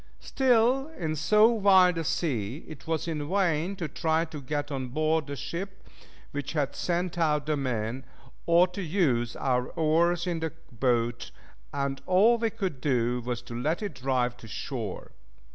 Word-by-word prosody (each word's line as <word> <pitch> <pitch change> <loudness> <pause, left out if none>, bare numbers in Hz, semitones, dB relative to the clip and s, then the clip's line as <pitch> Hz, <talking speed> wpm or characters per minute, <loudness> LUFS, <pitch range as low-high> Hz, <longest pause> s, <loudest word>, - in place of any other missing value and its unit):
Still 260 +1 +2
in 155 -3 -2
so 210 +8 +5
wild 190 -5 +5
a - - -1
sea 135 - -2
it 155 -2 -11
was 160 0 -1
in 150 -2 -3
vain 180 -1 +1
to 175 -4 -3
try 160 +2 0
to 155 -3 -8
get 145 +2 -3
on 130 -2 -3
board 155 +3 0
the 140 - -4
ship 190 - -6 0.4
which 140 0 -4
had 145 -4 -1
sent 175 0 -1
out 150 -3 +2
the 155 0 +1
men, 125 -2 -2 0.4
or 170 +1 +6
to 190 +3 -6
use 150 - +1
our 125 -2 0
oars 170 +2 +2
in 175 -2 -1
the 160 -1 -3 0.2
boat, 120 0 0 0.4
and 140 -1 -2
all 215 +6 +5
we 225 0 +1
could 190 - -4
do 125 -3 +1
was 120 0 -3
to 120 - -9
let 150 - -1
it 205 - -3
drive 125 -2 0
to 115 - -12
shore. 100 - -5
155 Hz, 170 wpm, -28 LUFS, 130-180 Hz, 0.4 s, or